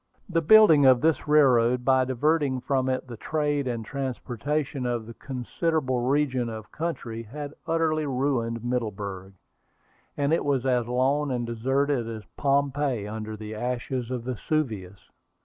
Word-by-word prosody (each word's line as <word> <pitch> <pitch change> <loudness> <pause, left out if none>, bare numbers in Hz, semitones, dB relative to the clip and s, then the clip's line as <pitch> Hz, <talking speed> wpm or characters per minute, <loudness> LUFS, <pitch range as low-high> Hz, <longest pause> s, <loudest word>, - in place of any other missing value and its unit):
The 170 -4 +1
building 165 -4 +7
of 130 -2 +6
this 160 -1 +1
railroad, 125 -5 +4
by 130 -1 +4
diverting 135 +1 +1
from 130 0 0
it 130 0 -1
the 120 -3 -9
trade 145 0 -1
and 115 -3 -3
transportation 135 +1 -3
of 120 -2 -2
a 115 - -8
considerable 130 +2 -2
region 130 -1 +1
of 110 -2 -8
country, 140 -9 -4
had 145 +6 -7
utterly 160 -2 +1
ruined 125 -4 -1
Middleburg, 100 -6 -3 0.8
and 145 +2 +1
it 165 - +2
was 135 -3 0
as 125 -3 +1
lone 135 +4 +1
and 120 -2 -1
deserted 130 +2 0
as 110 -2 -6
Pompeii 140 -4 0
under 110 0 -5
the 110 0 -7
ashes 125 +2 -3
of 125 -2 -3
Vesuvius. 115 - -3
130 Hz, 145 wpm, -26 LUFS, 115-145 Hz, 0.8 s, building